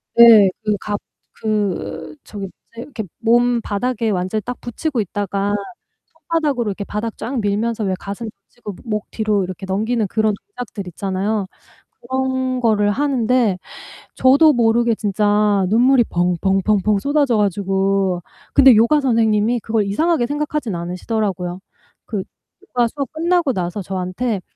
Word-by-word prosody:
네. 225 -4 +8
그 210 -1 +1
갑 205 0 -3 0.4
그 190 -7 -2
저기 200 -2 -7 0.3
뭐지 230 - -8
이렇게 245 -3 -6 0.2
몸 240 +1 +3
바닥에 230 +2 -1
완전히 185 +2 -1
딱 245 +3 -6
붙이고 250 +3 -3
있다가 200 0 -2 0.5
손바닥으로 300 -8 -1
이렇게 200 +1 -5
바닥 210 +2 -4
쫙 255 +1 -3
밀면서 215 +2 -1
왜 190 -2 0
가슴 200 +3 -6 0.2
붙이고 210 -5 -9
목 210 -2 -2
뒤로 210 -3 0 0.2
넘기는 220 +4 0
그런 220 +2 +1
동작들 220 - -8
있잖아요. 195 +3 -2 0.6
그런 260 0 -1
거를 210 -3 +2
하는데 250 -5 +1 0.6
저도 280 +4 +5
모르게 235 -1 +2
진짜 205 -1 +2
눈물이 245 +3 +4
펑펑 180 +2 +1
펑펑 210 0 +2
쏟아져 280 -1 +1
가지고 195 -2 0 0.3
근데 265 -3 +7
요가 235 +8 +4
선생님이 225 -2 +2
그걸 220 -1 0
이상하게 305 +7 +1
생각하진 295 -4 -2
않으시더라고요. 180 +1 -3 0.5
그 205 -4 -3 0.4
요가 240 -1 +1
수업 275 +1 -5
끝나고 335 -2 +1
나서 180 0 -3
저한테 190 +4 -3
220 Hz, 305 characters per minute, -19 LUFS, 200-245 Hz, 0.6 s, 네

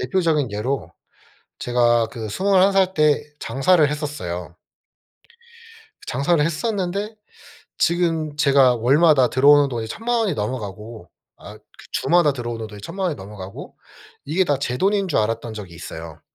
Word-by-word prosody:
대표적인 150 - 0
예로 105 -4 -3 0.7
제가 120 -1 +2
그 110 -1 -7
21 190 - +3
살 190 -1 +2
때 150 -3 +2 0.2
장사를 145 +6 +2
했었어요. 90 - -5 1.5
장사를 150 +4 +1
했었는데 200 +4 -2 0.6
지금 165 -3 0
제가 135 -4 +4
월마다 135 +3 +4
들어오는 145 +2 +5
돈이 115 -3 -4
10,000,000 235 - -1
원 220 -3 +1
이 - - 0
넘어가고 105 -4 -6 0.3
아 - - -12
그 - - -30 0.3
주마다 170 -4 +3
들어오는 120 -3 -5
돈이 105 -1 -11
10,000,000 190 - -4
원이 165 - -2
넘어가고 100 -3 -10 0.5
이게 170 +6 +1
다 145 -5 0
제 125 -3 -2
돈인 195 +5 +1
줄 165 - 0
알았던 115 +1 -2
적이 100 -5 -9
있어요. 80 -1 -9
140 Hz, 280 characters per minute, -21 LUFS, 115-170 Hz, 1.5 s, 들어오는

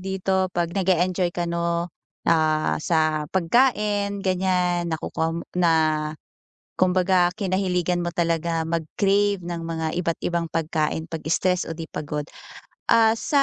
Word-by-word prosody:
dito, 190 0 0
pag 170 -1 -1
nag-eenjoy 185 -1 +1
ka 175 - -1
'no, 170 0 -1 0.3
ah, 155 -1 +2
sa 155 -2 +1
pagkain, 205 0 +1
ganyan, 180 -2 +1
nakukuha 160 0 -2
mo 170 - -4
na 175 -2 +3 1.0
kumbaga 180 -1 +3
kinahiligan 180 -3 0
mo 175 - -3
talaga 165 -1 0
mag-crave 195 +4 +1
ng 170 -1 -5
mga 165 -1 -3
iba't 170 -2 -1
ibang 170 -1 -1
pagkain 160 0 -1
pag-stress 170 +3 0
o - - -5
di 165 -1 -7
pagod, 150 0 -4 0.6
ah, 225 -1 +5
sa, 275 +5 +1
175 Hz, 125 wpm, -24 LUFS, 165-190 Hz, 1.0 s, ah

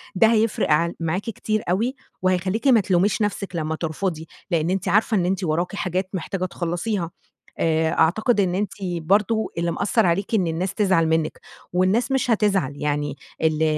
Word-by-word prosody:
ده 205 +4 +5
هيفرق 225 -6 +1
عل 170 +3 +2
معاكِ 165 +3 -1
كتير 215 0 -2
أوي، 225 +9 0 0.3
وهيخليكِ 185 +6 0
ما 250 -4 +6
تلوميش 190 +3 +1
نفسِك 200 -3 -2
لمّا 160 -1 -1
ترفضي، 165 0 -3 0.2
لأن 165 -1 +1
أنتِ 190 +1 -1
عارفة 215 +1 +3
إن 180 - +1
أنتِ 190 +1 -1
وراكِ 175 +4 -1
حاجات 185 -1 -2
محتاجة 185 0 -3
تخلصيها، 175 +1 -2 0.5
آآ، 160 0 +2
أعتقد 210 +8 +3
إن 180 -3 +2
أنتِ 200 0 -1
برضه 195 +6 +1
اللي 170 0 0
مأثّر 220 +6 +1
عليكِ 185 +5 +1
إن 190 -5 +2
الناس 170 +3 -2
تزعل 185 -6 +2
منِّك، 160 -1 0 0.3
والناس 200 +9 +2
مش 265 -2 +1
هتزعل، 200 - +1
يعني 145 -1 -2 0.3
ال 160 -1 +2
185 Hz, 165 wpm, -23 LUFS, 165-210 Hz, 0.5 s, ما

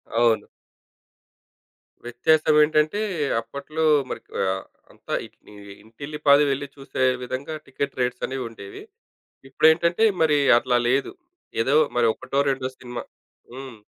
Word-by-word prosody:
అవును. 115 -1 +2 1.6
వ్యత్యాసం 155 +5 +2
ఏంటంటే, 155 +6 +1 0.4
అప్పట్లో 140 +7 -5 0.3
మరి - - -5 0.2
ఆహ్, 95 0 -1 0.3
అంతా - - -9
ఇట్ని 105 - -20 0.3
ఇంటిల్లి 140 +7 -9
పాది 140 +1 +7
వెళ్లి 140 +1 -3
చూసే 135 -1 -4 0.2
విధంగా 130 +5 -5
టికెట్ 135 +1 -5
రేట్సనేవి 125 +1 -2
ఉండేవి. 100 -3 -11 0.7
ఇప్పుడెంటంటే, 170 +8 +3 0.2
మరి 150 -2 +3 0.2
అట్లా 125 0 +1
లేదు. 135 - 0 0.5
ఏదో 135 +5 +1 0.2
మరి 120 -1 +4
ఒకటో 130 +2 -3
రెండో 130 -1 -3
సినిమా 125 -1 -7 0.5
హ్మ్. 130 -3 -9
135 Hz, 110 wpm, -23 LUFS, 125-150 Hz, 1.6 s, పాది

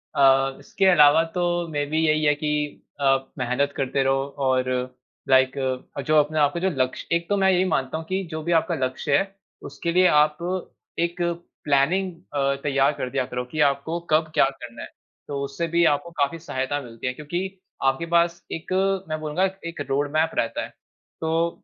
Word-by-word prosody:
अ, 135 -1 +4
इसके 195 - -1
अलावा 160 -3 +6
तो 175 -1 0
मेबी 145 +1 -1
यही 155 0 +2
है 150 - +5
कि 150 0 -2 0.2
आप 135 -1 +2
मेहनत 130 +3 0
करते 135 0 0
रहो 135 0 +2 0.2
और 130 0 +1 0.6
लाइक 130 0 +4 0.4
अ, - - -1
जो 155 +3 +1
अपने 150 +1 +2
आपका 145 +3 +2
जो 190 +1 +1
लक्ष्य 130 - -6
एक 170 0 -2
तो 205 - +2
मैं 190 0 +4
ये 180 - +3
भी 185 - +2
मानता 135 +3 -1
हूँ 160 - -7
कि 190 +1 -1
जो 155 - -4
भी 170 - -2
आपका 170 - -3
लक्ष्य 130 +2 0
है, 195 +3 -2 0.3
उसके 145 +4 -4
लिए 180 +1 +5
आप 150 -1 +4 0.6
एक 170 +1 -1 0.4
प्लानिंग 160 +7 +2 0.2
अ, 140 -1 +1
तैयार 140 -1 +3
कर 125 - -3
दिया 130 0 -1
करो 125 0 -4
कि 155 - -4
आपको 160 +5 -4
कब 155 0 +2
क्या - - +5
करना 120 -3 -10
है। - - -9 0.4
तो 140 -1 -3
उससे 140 +5 -3
भी 170 +1 +2
आपको 145 +3 +1
काफ़ी 145 +1 -1
सहायता 145 -3 -2
मिलती 115 0 -7
है 125 - -1
क्योंकि 175 +7 -5 0.2
आपके 135 +5 +1
पास 170 0 +2
एक 165 +2 -6 0.4
मैं 155 0 -2
बोलूँगा, 155 +5 0 0.2
एक 170 -3 -5
रोडमैप 145 +4 +1
रहता 115 - -1
है। - - -7 0.5
तो 165 +1 +1
150 Hz, 190 wpm, -24 LUFS, 135-170 Hz, 0.6 s, अलावा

